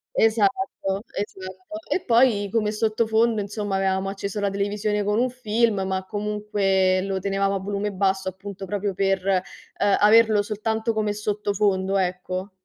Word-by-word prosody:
Esatto, 220 -2 +1
esatto. 190 +8 -6
E 365 - +1
poi, 230 -5 +3
come 215 -2 +1
sottofondo, 220 +1 +1
insomma, 205 0 -3
avevamo 190 0 0
acceso 200 +1 -4
la 200 -1 +1
televisione 205 +1 -1
con 210 +2 +1
un 255 +1 +2
film, 230 -4 0
ma 190 0 -2
comunque 205 -2 0
lo 195 -1 -2
tenevamo 195 +1 0
a 195 - -1
volume 205 +1 -3
basso, 190 -1 0
appunto, 195 +1 -8
proprio 205 0 -2
per, 195 -1 0
eh, 190 -2 +3 0.6
averlo 215 0 +5
soltanto 220 +2 -2
come 210 -1 0
sottofondo, 205 -2 0
ecco. 185 +1 -2
205 Hz, 140 wpm, -24 LUFS, 195-215 Hz, 0.6 s, averlo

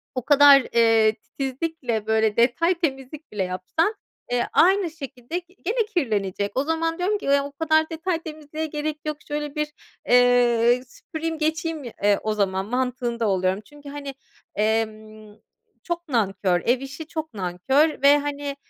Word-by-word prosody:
o 255 -2 -3
kadar, 285 -1 +7
eee, 225 -2 +4
titizlikle, 260 -1 -4
böyle, 220 -1 +2
detay 255 +10 +3
temizlik 295 -3 -4
bile 200 -2 -1
yapsan, 185 - -1 0.4
eee, 245 -1 +1
aynı 375 -1 +4
şekilde 275 0 -6
gene 390 +6 -3
kirlenecek. 205 - -1
O 265 - +2
zaman 325 +1 -1
diyorum 380 +4 0
ki, 395 - -5
"O 280 0 -6
kadar 315 +2 +1
detay 330 +1 -2
temizliğe 310 0 -6
gerek 300 0 -3
yok, 305 -1 -3
şöyle 295 0 -4
bir, 300 0 -1 0.4
eee, 245 0 +4
süpüreyim 320 +3 -6
geçeyim, 320 0 -2 0.2
eee, 205 0 +4
o 215 - 0
zaman." 190 -2 0
mantığında 245 -1 -1
oluyorum. 190 0 0
Çünkü, 290 +2 -13
hani, 280 -1 -7 0.4
emm, 215 0 -2 0.5
çok 345 0 -4
nankör, 195 -7 +1
ev 245 +2 +3
işi 275 +4 -8
çok 315 -2 -5
nankör 215 - +1
ve, 285 +1 +7
hani, 285 -1 -4
275 Hz, 145 wpm, -23 LUFS, 220-315 Hz, 0.5 s, kadar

